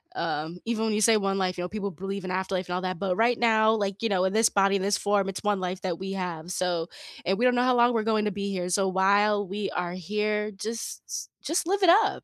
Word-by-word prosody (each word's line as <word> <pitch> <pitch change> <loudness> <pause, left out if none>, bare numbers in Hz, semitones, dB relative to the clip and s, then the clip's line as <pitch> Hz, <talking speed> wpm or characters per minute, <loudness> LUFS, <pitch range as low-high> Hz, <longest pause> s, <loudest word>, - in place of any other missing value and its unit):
Um, 165 - -3
even 225 -1 -1
when 220 - 0
you 210 - 0
say 220 +1 +5
1 195 -1 0
life, 185 -2 -1
you 175 - -3
know, 180 - -4
people 200 -1 -4
believe 195 +1 -5
in 185 - -4
afterlife 185 0 -2
and 180 - -3
all 185 - -2
that, 185 -2 -3
but 190 -2 0
right 230 +3 +2
now, 220 -1 +4
like, 200 -2 -2
you 230 - 0
know, 185 -2 +1
in 190 - 0
this 225 +1 +4
body, 195 0 +3
in 195 - 0
this 200 +1 +1
form, 205 -1 +1
it's 190 - -6
1 205 -2 +1
life 185 0 -4
that 180 -3 -3
we 195 0 -4
have, 175 -3 -4
so 180 -3 -1 0.4
and 190 +1 +1
we 245 - +1
don't 250 -1 +4
know 245 - +2
how 255 0 +3
long 240 0 +4
we're 225 -2 +1
going 215 -1 +1
to 210 - 0
be 200 +1 -3
here, 180 -2 -3
so 190 +2 +1
while 200 +2 +3
we 200 +1 -3
are 175 -1 -3
here, 210 +3 -2
just 225 +3 -6
just 325 +1 -1
live 395 +1 0
it 360 - +6
up. 400 +6 +4
200 Hz, 275 wpm, -26 LUFS, 185-220 Hz, 0.4 s, it